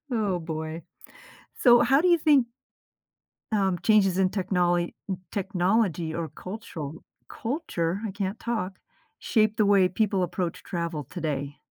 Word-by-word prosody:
Oh, 205 -5 0
boy. 160 -1 -5 0.8
So 240 -2 +7
how 270 +4 +4
do 360 - +3
you 345 -1 +5
think 290 -6 +4 1.0
um, 195 -4 +1
changes 200 -4 +4
in 190 -1 +3
technol 175 -3 0 0.4
technology 185 -4 0
or 165 0 -3
cultural 170 -7 -8 0.3
culture- 200 - -2
I - - -5
can't 200 +2 -3
talk- 195 -6 -3 0.5
shape 215 -2 +3
the 215 - +4
way 200 -2 +5
people 195 0 0
approach 175 -1 -3
travel 170 -4 -3
today? 145 -2 -4
190 Hz, 130 wpm, -26 LUFS, 170-215 Hz, 1.0 s, So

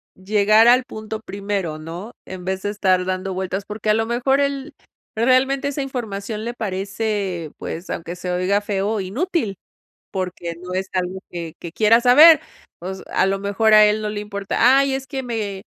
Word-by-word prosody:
llegar 210 +3 +4
al 250 +2 +6
punto 220 -2 -7
primero, 195 -6 -3
¿no? 170 +8 -8
En 185 -1 -8
vez 190 0 -2
de 205 - -1
estar 185 -3 +1
dando 185 +1 -2
vueltas, 190 +1 -3
porque 210 +1 -4
a - - +6
lo 225 +1 +1
mejor 245 +4 +1
él 280 +1 -2 0.4
realmente 260 +4 +2
esa 285 0 -3
información 220 -5 -4
le 235 - -3
parece, 195 -5 -3
pues, 170 +3 -6
aunque 170 +1 -5
se 180 0 -5
oiga 185 +3 +1
feo, 205 +1 -1
inútil, 225 - -2 0.6
porque 180 -2 -4
no 180 0 -7
es 190 +1 -2
algo 185 0 -2
que 170 -2 -6
que 170 - -7
quiera 220 +4 +4
saber. 300 +6 +8 0.4
Pues, 190 +2 -6
a - - +3
lo 195 0 0
mejor 200 +2 +2
a 215 0 +9
él 210 +1 +2
no 210 - -2
le 210 0 -4
importa: 210 +5 +2
"Ay, 275 -1 +2
es 270 0 -4
que 265 0 -4
me, 215 -6 -4
205 Hz, 185 wpm, -21 LUFS, 190-235 Hz, 0.6 s, a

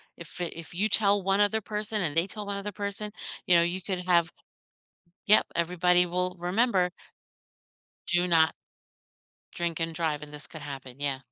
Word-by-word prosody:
if 170 +1 -11
if 165 0 -6
you 210 +4 +1
tell 200 -2 +3
one 195 +1 +2
other 210 +2 +3
person 210 -1 -2
and 155 -1 -1
they 170 +3 +2
tell 210 +1 -7
one 200 0 -3
other 205 +1 -4
person, 200 +2 -5 0.4
you 180 - +6
know, 170 - +6
you 180 +2 -2
could 180 -1 -4
have" 175 -1 +3 1.0
Yep, 210 - +7
everybody 180 +1 +3
will 180 +1 -2
remember 185 0 +2 1.2
do 175 +1 +2
not 160 -3 +4 1.0
drink 170 -1 -1
and 165 0 -1
drive, 155 -3 -1
and 150 0 -9
this 150 0 -10
could 155 -2 -10
happen, 135 -3 -8
yeah. 140 -2 0
180 Hz, 170 wpm, -28 LUFS, 165-200 Hz, 1.2 s, Yep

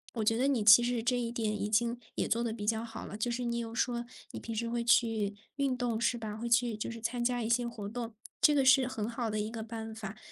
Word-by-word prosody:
我 225 - -1
觉 225 +1 +3
得 255 +4 +2
你 260 -6 +1
其 215 +3 +9
实 240 -1 0
这 245 +1 +1
一 235 -1 -2
点 215 -3 -2
已 205 - -1
经 235 +2 +1 0.2
也 - - 0
做 235 +1 +1
得 235 - -1
比 215 -2 -5
较 220 +1 0
好 225 -1 -7
了， - - -7
就 220 +3 -1
是 240 +1 -2
你 235 0 -1
有 230 -1 -5
说 240 -1 0 0.3
你 - - -6
平 230 - -6
时 230 +2 -1
会 235 0 -1
去 225 -3 +2 0.2
运 275 -3 0
动 235 -2 -1
是 240 +1 +1
吧， 215 -2 -5
会 235 +2 -4
去 235 -1 +3
就 215 - -4
是 230 0 -7
参 235 +2 -2
加 245 0 0
一 - - -2
些 240 +1 +2
活 225 -4 -6
动， 230 0 -5 0.3
这 300 - +6
个 275 -2 +3
是 265 -1 +6
很 220 -5 -3
好 235 0 -3
的 215 0 -2
一 210 +1 -3
个 225 -1 -5
办 225 0 -6
法。 215 -1 -7
230 Hz, 305 characters per minute, -31 LUFS, 220-240 Hz, 0.3 s, 其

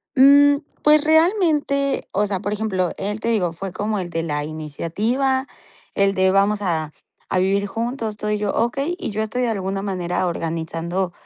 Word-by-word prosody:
Mm, 285 +1 +6 0.2
pues 300 0 +5
realmente, 315 -4 +2
o 205 +2 +1
sea, 195 -2 -2
por 205 +1 -3
ejemplo, 195 -5 -1
él 205 +2 -3
te 230 - -4
digo, 185 -7 +1
fue 190 +3 -6
como 210 +3 -2
el 180 -2 -4
de 165 -1 -2
la 150 -2 -2
iniciativa, 210 - -1 0.5
el 200 0 +3
de: 190 -1 +3
"Vamos 200 +2 +2
a 160 -5 -1 0.4
a 185 - +1
vivir 200 +2 +1
juntos", 230 +2 -3
estoy 210 0 -2
yo, 205 -1 -1
"Okey", 275 +9 0
y 370 - -3
yo 210 +1 -2
estoy 220 +3 -2
de 245 - +1
alguna 195 -2 -2
manera 185 -2 -2
organizando, 170 +2 -3
205 Hz, 175 wpm, -21 LUFS, 185-250 Hz, 0.5 s, Mm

